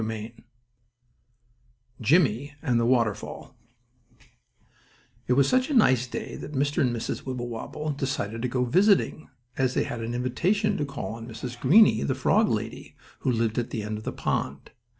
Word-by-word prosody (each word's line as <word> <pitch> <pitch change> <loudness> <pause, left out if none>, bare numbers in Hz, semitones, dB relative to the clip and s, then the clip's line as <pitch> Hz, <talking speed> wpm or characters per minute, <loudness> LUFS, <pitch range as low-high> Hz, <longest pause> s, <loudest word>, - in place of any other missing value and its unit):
STORY 110 -1 -4
IV 115 +1 -15 1.6
JIMMIE 145 - +2
AND 125 -6 +2
THE 115 - +1
WATERFALL 115 +1 -1 1.7
It 125 - +3
was 135 +1 +4
such 255 +2 +2
a 290 - 0
nice 130 - +4
day - - -6
that 150 - -8
Mr. 145 +1 0
and 130 - +3
Mrs. 115 -1 -4
Wibblewobble 125 +4 -4
decided 130 -6 -3
to 125 - 0
go 125 0 0
visiting, 185 - +2 0.3
as 130 -1 +1
they - - +2
had 120 - -5
an 115 +1 -3
invitation 185 - +1
to 145 - -1
call 140 -5 -5
on 115 0 -8
Mrs. 120 +1 -7
Greenie, 190 - +6
the 70 - 0
frog - - +3
lady - - -4 0.2
who 130 - 0
lived 115 -1 0
at 120 - -3
the 110 - -4
end 105 0 -4
of - - -11
the - - -3
pond. 70 +1 -3
125 Hz, 170 wpm, -26 LUFS, 115-145 Hz, 1.7 s, Greenie